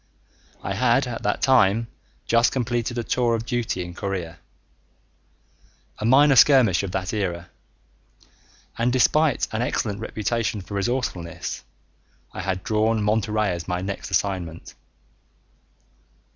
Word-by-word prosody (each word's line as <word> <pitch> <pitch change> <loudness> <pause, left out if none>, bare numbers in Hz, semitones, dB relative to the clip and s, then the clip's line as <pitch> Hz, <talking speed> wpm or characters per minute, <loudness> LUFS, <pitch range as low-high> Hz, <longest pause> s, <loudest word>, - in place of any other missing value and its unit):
I 95 - -2
had 125 +5 +2
at 120 -2 -5
that 105 - -1
time 115 -4 +4 0.4
just 115 +1 +3
completed 120 -1 -2
a 120 - -1
tour 120 0 +1
of 115 0 -4
duty 115 -6 -2
in 90 - -9
Korea, 85 -4 -5 1.6
a - - -3
minor 135 +4 +6
skirmish 125 - +6
of 100 -2 -4
that 95 +1 -2
era, 90 -5 -3 1.3
and 120 +1 +2
despite 145 +3 +2
an 110 0 -2
excellent 105 -4 -2
reputation 110 0 -2
for 100 - -10
resourcefulness, 100 -5 -3 0.7
I - - -5
had 95 0 -3
drawn 110 -1 +1
Monterey 105 -1 +1
as 85 -2 -5
my 90 0 -2
next 100 +1 -5
assignment. 90 -3 -2
110 Hz, 125 wpm, -23 LUFS, 95-120 Hz, 1.6 s, minor